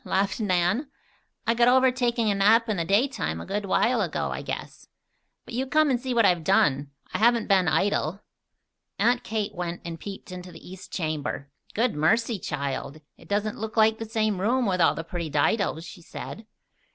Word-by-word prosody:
laughed 195 +3 0
Nan. 205 - +1 0.6
"I 230 - +3
got 235 +1 +3
over 260 +1 +5
taking 240 -3 +1
a - - +2
nap 220 +4 +4
in 215 -3 -1
the 170 - 0
daytime 200 - +1
a - - -7
good 205 +1 -3
while - - +2
ago, - - -2
I - - -4
guess. - - -7 0.6
But - - -10
you 260 +3 -1
come 305 +2 +3
and 245 -2 0
see 260 0 -3
what 235 -3 +4
I - - +7
have 175 -2 0
done. 140 -2 +2 0.2
I - - -1
haven't 235 0 +3
been 190 -3 +3
idle." 195 0 +1 0.8
Aunt 240 +1 +2
Kate 215 -1 -2
went 175 -2 -4
and 165 -1 -6
peeped 195 -1 -8
into 180 0 -8
the - - -13
east 185 +1 -11
chamber. 150 -4 -3 0.2
"Good 235 +2 +2
mercy, 220 +8 +1
child! 140 0 -4
It - - -18
doesn't 205 +1 -1
look 220 +1 -5
like 220 0 +4
the 225 - -4
same 215 -4 0
room, 245 +5 +2
with 185 -3 +1
all 165 - +4
the 165 - -4
pretty 170 -1 -5
didos," 160 +3 +1
she 175 +2 -11
said. 215 +5 -9
205 Hz, 200 wpm, -26 LUFS, 175-230 Hz, 0.8 s, I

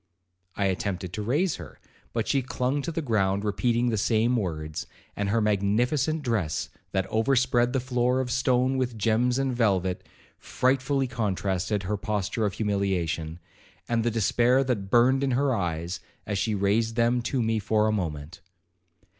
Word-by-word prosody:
I 100 - 0
attempted 95 -1 -2
to 105 - -3
raise 145 - 0
her, 80 -6 -11 0.3
but 115 -2 -2
she 140 - +2
clung 130 +2 -1
to 170 - -4
the 165 0 -3
ground, 100 -5 +1
repeating 120 +3 +1
the 110 -3 0
same 115 +3 +2
words; 80 -7 -3 0.3
and 100 -1 -1
her 115 +2 +2
magnificent 120 +9 +1
dress, 100 - -1 0.2
that 95 -1 0
overspread 120 +2 +2
the 135 - +1
floor 125 0 +1
of 125 -2 -2
stone 130 +1 +2
with 125 -3 -2
gems 115 +4 +2
and 135 -2 0
velvet, 95 -6 +1 0.4
frightfully 135 +1 +1
contrasted 100 -4 -1
her 105 +3 -2
posture 105 +2 -1
of 100 - -4
humiliation, 90 -6 -1 0.5
and 115 -1 +1
the 120 - +2
despair 120 +4 +3
that 110 -7 -2
burned 130 +5 +4
in 135 - +1
her 140 -1 +2
eyes, 85 -2 -2 0.3
as 100 -2 -2
she 105 +2 0
raised 110 +3 +1
them 120 +1 +2
to 120 +1 -1
me 110 0 +1
for 105 +1 +1
a - - +2
moment. 80 -6 -4
110 Hz, 165 wpm, -26 LUFS, 100-125 Hz, 0.5 s, burned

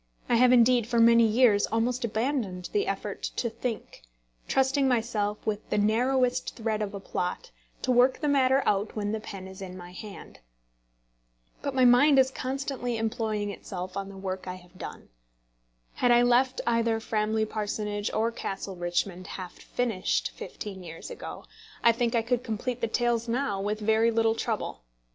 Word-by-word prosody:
I 240 - +3
have 250 +1 +6
indeed 240 -1 +5
for 235 -1 +1
many 230 0 +6
years 220 -2 +4
almost 240 +3 0
abandoned 220 -5 -2
the 415 0 +1
effort - - -3
to 235 - -1
think, 230 0 -5 0.5
trusting 270 +1 +2
myself, 220 -4 0
with 215 -1 -3
the - - 0
narrowest 250 +4 +1
thread 220 -2 -2
of 205 -1 -3
a - - -4
plot, 195 - -4 0.3
to 255 - +1
work 250 +1 +4
the 300 - -1
matter 270 -1 +3
out 205 +1 0
when 205 -1 -2
the 220 - -2
pen 195 -3 -8
is 190 +1 -11
in 185 -1 -7
my 175 -1 -10
hand. 200 +2 -10 1.2
But 280 -2 -3
my 260 -1 +5
mind 265 +4 +6
is 265 0 +5
constantly 260 -2 -3
employing 220 -2 -1
itself 185 -2 -7
on 195 0 -4
the 195 - -10
work 190 -1 -5
I 180 - -4
have 180 0 -16
done. - - -8 0.8
Had 245 - +1
I 240 0 +6
left 250 +2 +3
either 230 -1 +2
Framley 220 0 0
Parsonage 210 -1 -3
or 225 +2 +1
Castle 195 -3 -5
Richmond 175 +1 -2
half 185 -2 -7
finished 225 -7 -1
fifteen 195 -3 -8
years 165 -2 -9
ago, - - -8 0.4
I 235 - +7
think 235 0 0
I 230 - +2
could 245 +1 0
complete 240 +2 -3
the 230 - +1
tales 235 0 0
now 230 -5 -1
with 210 +2 -2
very 220 +2 +3
little 225 -1 +2
trouble. 225 - -3
225 Hz, 170 wpm, -28 LUFS, 205-245 Hz, 1.2 s, I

